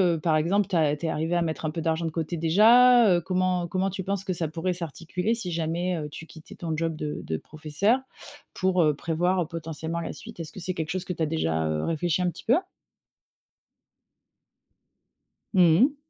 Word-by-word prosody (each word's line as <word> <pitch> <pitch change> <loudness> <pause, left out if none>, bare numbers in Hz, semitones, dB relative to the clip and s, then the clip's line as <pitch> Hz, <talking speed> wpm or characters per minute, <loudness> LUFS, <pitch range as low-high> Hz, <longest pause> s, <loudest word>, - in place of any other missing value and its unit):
heu, 160 - -4
par 160 -1 +1
exemple, 195 +6 +1
tu 195 - -2
as 150 -3 +3
tu 160 +2 -4
es - - 0
arrivé 160 +3 -1
à 175 - +2
mettre 160 -1 -2
un 155 - -1
peu 165 0 -4
d'argent 165 +1 0
de 160 - -2
côté 165 +1 -3
déjà, 225 +7 +6
heu, 175 - +1
comment 180 0 0
comment 190 +2 0
tu 190 0 -5
penses 195 0 -2
que 190 -2 -2
ça 165 -2 -2
pourrait 165 +4 -2
s'articuler 175 +5 -3
si 195 -7 -3
jamais, 170 +2 -1
heu, 150 -2 -4
tu 165 +2 -10
quittais 160 -1 -13
ton 165 -2 -3
job 165 -1 -1
de 150 -1 -4
de 80 - -2
professeur 155 - 0 0.5
pour, 185 -2 +2
heu, 150 -1 +3
prévoir 175 +3 0
potentiellement 165 0 -5
la - - -5
suite? 225 -5 -11
Est-ce 160 -2 -6
que - - -10
c'est 185 +1 -3
quelque 160 -1 -3
chose 185 0 -3
que 180 - -3
tu 165 - -2
as - - +3
déjà, 80 - -1
heu, 75 0 -1
réfléchi 165 +2 0
un 180 - +2
petit - - -10
peu? 245 - +4 3.0
Mmh 175 -3 +5
mh. 280 +3 +4
170 Hz, 215 wpm, -26 LUFS, 160-185 Hz, 3.0 s, déjà